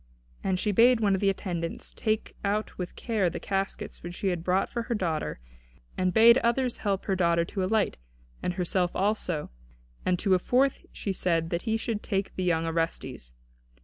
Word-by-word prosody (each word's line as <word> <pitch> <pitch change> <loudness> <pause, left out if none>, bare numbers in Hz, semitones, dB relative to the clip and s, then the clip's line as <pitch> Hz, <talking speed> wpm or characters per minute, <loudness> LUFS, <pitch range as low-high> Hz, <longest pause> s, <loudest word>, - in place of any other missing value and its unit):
And 185 -1 0
she 210 - +1
bade 235 +4 +5
one 205 -3 +3
of 190 - 0
the 200 - +4
attendants 175 -4 -3
take 215 -1 -1
out 210 +2 -1
with 180 -1 -5
care 215 -6 0
the - - -5
caskets 195 0 -3
which 175 +1 -7
she 195 - -1
had 175 -2 -2
brought 185 +2 +2
for 235 - -3
her 230 +1 -2
daughter 165 - -2 0.6
and 185 0 +1
bade 230 +6 +7
others 240 +1 +1
help 195 -2 -1
her 195 - +1
daughter 170 -2 +2
to 190 +2 -3
alight, 210 +2 +1 0.4
and 180 - -1
herself 180 0 0
also, 185 - -1 0.5
and 180 -1 +2
to 195 +1 +2
a 185 - +4
fourth 260 +7 +1
she 195 - -3
said 165 -3 0
that 170 0 0
he 220 - +2
should 225 -2 -3
take 195 -2 -2
the 185 - -2
young 165 -2 +1
Orestes. 165 - -3
190 Hz, 190 wpm, -28 LUFS, 175-215 Hz, 0.6 s, bade